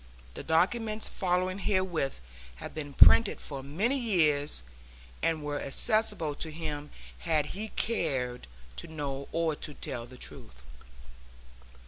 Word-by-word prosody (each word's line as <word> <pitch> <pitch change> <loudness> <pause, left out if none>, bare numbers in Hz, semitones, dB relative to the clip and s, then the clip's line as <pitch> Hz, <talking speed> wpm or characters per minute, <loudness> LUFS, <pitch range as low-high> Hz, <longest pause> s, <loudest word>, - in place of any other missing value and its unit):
The - - -6
documents 215 +7 +1
following 185 +1 0
herewith 185 - 0 0.3
have - - -8
been 145 -2 -5
printed 220 +9 +7
for 140 -2 -6
many 200 - 0
years, 150 - +2 0.6
and 160 -2 +1
were 145 0 -2
accessible 205 +1 0
to 160 - -2
him 150 -2 -4 0.3
had 155 -3 +1
he 215 +3 -4
cared 135 - -1 0.3
to - - -6
know 140 -3 -4
or 165 -2 +1
to 150 - -7
tell 120 -2 -4
the 125 - -12
truth. 65 - -11
160 Hz, 125 wpm, -30 LUFS, 145-190 Hz, 0.6 s, printed